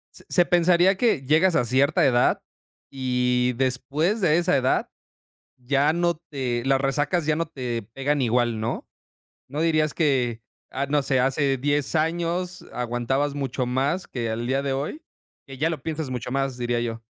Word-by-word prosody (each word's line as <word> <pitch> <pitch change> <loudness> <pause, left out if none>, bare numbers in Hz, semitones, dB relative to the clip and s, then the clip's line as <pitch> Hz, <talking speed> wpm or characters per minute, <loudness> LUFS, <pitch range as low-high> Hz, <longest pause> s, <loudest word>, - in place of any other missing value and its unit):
Se - - -15
se 175 -2 +4
pensaría 175 +2 +4
que 190 - +1
llegas 160 +6 +3
a - - +2
cierta 135 +6 +3
edad 125 -2 +3 0.5
y 125 -1 0
después 140 - 0
de 165 -3 +4
esa 175 -1 +2
edad 130 -1 +1 0.7
ya 140 +4 +1
no 170 0 +1 0.2
te 125 -5 -2
las 135 0 +2
resacas 145 +4 0
ya 155 -1 +2
no 165 0 -1
te 125 -6 -4
pegan 140 +2 0
igual, 120 -1 +1
¿no? 115 +2 -3 0.6
¿No 145 +3 -4
dirías 155 -2 +2
que, 125 -7 +1 0.3
ah, 135 +1 -2
no 145 +1 +2
sé, 135 -1 +1
hace 135 +1 +1
10 145 +3 -1
años 170 +3 -1
aguantabas 125 +4 -1
mucho 135 -2 -2
más 135 +9 -1
que 120 -3 -3
al 115 +2 -3
día 135 +2 +1
de 140 -1 -2
hoy? 140 - -3 0.4
Que 135 -2 -10
ya 155 +5 +1
lo 165 - -5
piensas 160 -3 -3
mucho 125 -1 -4
más, 135 -2 -1
diría 120 -1 -1
yo. 115 -1 -4
135 Hz, 170 wpm, -24 LUFS, 125-155 Hz, 0.7 s, se